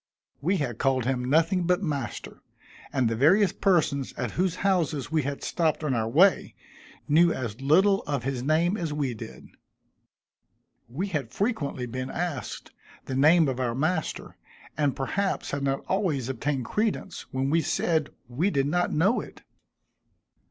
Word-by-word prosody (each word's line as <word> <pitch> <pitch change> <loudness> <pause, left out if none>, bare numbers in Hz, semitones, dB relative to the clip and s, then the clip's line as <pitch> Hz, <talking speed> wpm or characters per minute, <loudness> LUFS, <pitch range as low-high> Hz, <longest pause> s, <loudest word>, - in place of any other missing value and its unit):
We 185 +7 +1
had 125 -8 -3
called 130 -3 +1
him 130 -1 0
nothing 165 +4 +2
but 180 +2 +2
"master," 140 - -4 0.5
and 130 -3 +1
the 115 - 0
various 180 - +4
persons 155 -8 +1
at - - -4
whose 180 -1 0
houses 160 -7 0
we 160 -1 +2
had 140 0 -4
stopped 160 -3 0
on 145 -3 0
our 115 -2 0
way, 180 +10 +3 0.5
knew 165 +3 +5
as 120 -4 -4
little 190 +8 +4
of 140 -4 -2
his 130 -1 -2
name 165 +8 +1
as 165 -5 -3
we 145 -4 -1
did. 110 - -10 1.4
We 175 +12 -3
had 145 -10 -3
frequently 145 - -2
been 130 +2 -5
asked 160 - -4 0.3
the - - -5
name 155 +4 +5
of 130 -1 -2
our 120 -2 -1
master, 160 +4 -2 0.4
and 145 -3 +1
perhaps 195 +9 -2
had 140 - -2
not 135 0 -1
always 160 - 0
obtained 135 0 -2
credence, 215 - -2
when 135 +1 -1
we 165 +1 +3
said 155 0 0 0.2
we 140 +11 0
did 140 -6 +1
not 175 +5 0
know 195 +10 +2
it. - - -13
150 Hz, 160 wpm, -26 LUFS, 130-175 Hz, 1.4 s, knew